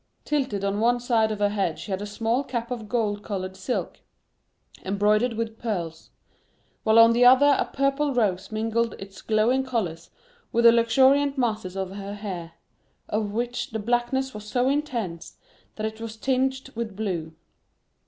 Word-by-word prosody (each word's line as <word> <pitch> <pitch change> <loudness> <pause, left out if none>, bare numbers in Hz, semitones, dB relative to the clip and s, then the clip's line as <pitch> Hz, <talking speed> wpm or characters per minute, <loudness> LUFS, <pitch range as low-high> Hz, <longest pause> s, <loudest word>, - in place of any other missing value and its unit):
Tilted 260 -10 -1
on 200 +1 -1
one 240 +2 +3
side 230 -3 +1
of 215 - -2
her 205 0 +2
head 195 -6 -1
she 210 - -8
had 190 +1 -2
a 205 - -4
small 225 +5 -1
cap 235 -3 -4
of 225 -4 -5
gold 210 -3 0
colored 190 -2 -5
silk, 190 +7 -3 0.8
embroidered 210 +5 +2
with 225 0 -4
pearls; 170 -8 -4 0.7
while 220 +1 +4
on 230 0 +8
the 240 +1 +3
other 265 +3 +7
a - - -1
purple 275 +1 +1
rose 200 -6 0
mingled 225 +1 -1
its 195 -1 -10
glowing 225 +5 +2
colors 180 -11 -3 0.4
with 235 0 +2
the 235 - +10
luxuriant 265 +5 +4
masses 215 -7 -1
of 190 -1 -3
her 200 +1 -6
hair, 185 -5 -6 0.6
of 210 0 -1
which 240 +3 -2
the 220 - -4
blackness 240 +4 0
was 210 0 -8
so 245 +4 +1
intense 240 - -3 0.4
that 215 - -3
it 220 +1 -5
was 225 -1 -6
tinged 265 +2 -1
with 225 -3 -5
blue. 175 -7 -3
225 Hz, 165 wpm, -25 LUFS, 205-245 Hz, 0.8 s, the